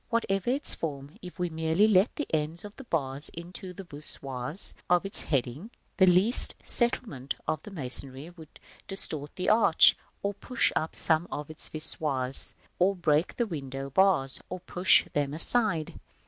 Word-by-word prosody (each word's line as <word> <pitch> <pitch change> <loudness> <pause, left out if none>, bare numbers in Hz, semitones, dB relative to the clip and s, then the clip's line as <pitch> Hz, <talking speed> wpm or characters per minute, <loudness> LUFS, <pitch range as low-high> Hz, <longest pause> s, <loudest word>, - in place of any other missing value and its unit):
Whatever 195 -3 -1
its 275 +4 -2
form, 140 -3 -6
if 180 -1 -11
we 180 -1 -2
merely 160 +6 +1
let 200 +1 +2
the 295 - -3
ends 160 +4 -2
of 205 - -11
the 270 - -12
bars 140 - -2
into 180 +2 -9
the 185 +2 -10
voussoirs 145 -1 0 0.2
of 180 +1 +2
its 195 - +2
heading, 140 - -3 0.3
the 190 - +5
least 185 +8 +4
settlement 230 - +1
of 155 - -2
the - - -11
masonry 135 -2 -2
would 165 -3 -16 0.3
distort 155 -7 -4
the 180 - -4
arch, 215 -6 +5 0.3
or 200 0 -1
push 250 +5 -1
up 160 - -2
some 160 +1 0
of 150 +1 -6
its 155 - -9
voussoirs, 140 -4 -2 0.2
or 190 +2 +2
break 160 -2 0
the 240 - -1
window 135 - -7
bars, 165 -6 +2
or 185 - -6
push 180 0 +3
them 145 0 -2
aside. 170 -3 +5
165 Hz, 160 wpm, -27 LUFS, 145-195 Hz, 0.3 s, the